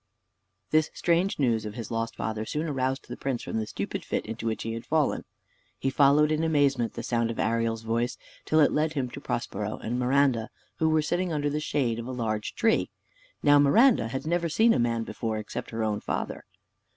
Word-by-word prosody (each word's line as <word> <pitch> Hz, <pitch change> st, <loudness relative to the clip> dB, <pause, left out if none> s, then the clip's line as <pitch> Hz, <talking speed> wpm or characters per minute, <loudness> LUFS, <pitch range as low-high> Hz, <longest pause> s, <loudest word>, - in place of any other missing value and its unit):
This 155 Hz, 0 st, +3 dB
strange 175 Hz, +4 st, +1 dB
news 115 Hz, -6 st, +1 dB
of 105 Hz, 0 st, -6 dB
his 115 Hz, -1 st, -6 dB
lost 115 Hz, 0 st, -2 dB
father 110 Hz, -1 st, -3 dB
soon 150 Hz, +8 st, -3 dB
aroused 130 Hz, -2 st, -1 dB
the -, -, -6 dB
prince 135 Hz, -3 st, -3 dB
from -, -, -3 dB
the 110 Hz, -, -3 dB
stupid -, -, -4 dB
fit -, -, -2 dB
into 115 Hz, 0 st, -5 dB
which 110 Hz, -, -2 dB
he 115 Hz, -, -3 dB
had 115 Hz, 0 st, -5 dB
fallen. 155 Hz, -3 st, 0 dB, 0.5 s
He 135 Hz, -, -1 dB
followed 145 Hz, +2 st, +5 dB
in 155 Hz, +1 st, +1 dB
amazement 140 Hz, -7 st, +2 dB
the 115 Hz, -, -6 dB
sound 115 Hz, -1 st, 0 dB
of 115 Hz, -, -4 dB
Ariel's 115 Hz, 0 st, 0 dB
voice, 115 Hz, +2 st, -1 dB, 0.3 s
till 155 Hz, 0 st, +3 dB
it 145 Hz, -, +5 dB
led 155 Hz, +1 st, +1 dB
him 130 Hz, -4 st, -2 dB
to -, -, -8 dB
Prospero -, -, -3 dB
and 120 Hz, +3 st, -3 dB
Miranda, 125 Hz, -3 st, +2 dB, 0.3 s
who 160 Hz, -, +2 dB
were 155 Hz, -1 st, +3 dB
sitting 175 Hz, +3 st, -1 dB
under 145 Hz, -2 st, 0 dB
the 150 Hz, -, -1 dB
shade 130 Hz, -6 st, 0 dB
of 115 Hz, -, -6 dB
a -, -, -4 dB
large 110 Hz, -4 st, -2 dB
tree. 230 Hz, -2 st, +2 dB, 0.5 s
Now 145 Hz, 0 st, +6 dB
Miranda 215 Hz, -, +5 dB
had 130 Hz, +5 st, -4 dB
never 170 Hz, +1 st, 0 dB
seen 225 Hz, +8 st, +4 dB
a -, -, +1 dB
man 115 Hz, -1 st, +1 dB
before, 110 Hz, 0 st, -3 dB
except 110 Hz, +3 st, -5 dB
her 115 Hz, -1 st, -3 dB
own 105 Hz, -1 st, 0 dB
father. -, -, -4 dB
130 Hz, 210 wpm, -27 LUFS, 115-150 Hz, 0.5 s, Now